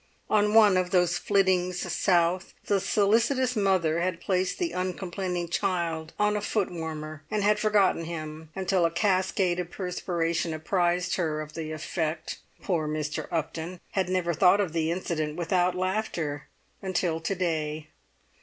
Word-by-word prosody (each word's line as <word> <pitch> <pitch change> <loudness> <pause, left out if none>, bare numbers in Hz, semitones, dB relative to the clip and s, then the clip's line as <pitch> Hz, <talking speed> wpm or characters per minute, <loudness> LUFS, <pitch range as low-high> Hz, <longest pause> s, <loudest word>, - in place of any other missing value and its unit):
On 210 0 +3
one 210 -4 +7
of 180 -1 +1
those 180 -2 +2
flittings 185 -3 +2
south 175 +1 +1
the 200 - +2
solicitous 235 +6 +2
mother 185 -6 +2
had 175 -1 -1
placed 185 0 0
the 350 -2 -1
uncomplaining 180 -1 -3
child 170 -3 -1
on 210 0 +2
a 210 - -1
footwarmer, 160 -7 -3
and 210 -1 0 0.2
forgotten 205 -6 +2
him 155 -1 -6
until 190 -1 +1
a 165 - +4
cascade 185 0 +1
of 175 -1 -3
perspiration 170 -3 -2
apprised 175 +2 0
her 160 -4 -1
of 155 0 -7
the 155 -1 -5
effect: 155 +1 -3 0.2
poor 165 -5 0
Mr. 150 0 -3
Upton 165 +2 -3
had 190 -2 0
never 180 -2 0
thought 180 +5 +5
of 185 -6 0
the 160 -1 0
incident 160 -3 -2
without 175 +1 +1
laughter, 180 -6 -2 0.3
until 180 -3 -1
to 165 +4 -2
day. 155 -4 -2
180 Hz, 145 wpm, -27 LUFS, 160-190 Hz, 0.3 s, one